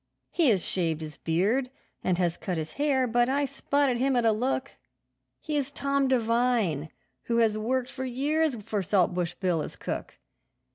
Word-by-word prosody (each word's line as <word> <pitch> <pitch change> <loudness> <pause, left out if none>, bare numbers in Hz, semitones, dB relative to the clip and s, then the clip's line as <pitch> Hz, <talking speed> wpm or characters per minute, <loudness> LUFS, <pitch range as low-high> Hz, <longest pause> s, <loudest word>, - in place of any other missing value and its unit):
He 330 -6 +3
has 195 -6 +2
shaved 165 -4 -1
his 155 -1 -7
beard, 205 +11 +1 0.3
and 180 -2 +1
has 175 -2 +1
cut 180 -3 -3
his 155 -1 -4
hair, 280 -3 +2
but 240 +1 +2
I 280 +2 +1
spotted 275 -2 0
him 265 +1 +2
at 240 -1 +2
a 225 - +5
look; 260 +4 -1 0.7
He 300 - -4
is 280 -1 -1
Tom 280 -1 0
Devine, 230 - +1 0.4
who 235 - 0
has 225 -2 +3
worked 245 +4 -1
for 260 -1 -5
years 285 +4 +1
for 210 -1 -3
Saltbush 180 -2 +1
Bill 180 -4 0
as - - -6
cook. - - -5
240 Hz, 175 wpm, -27 LUFS, 185-270 Hz, 0.7 s, a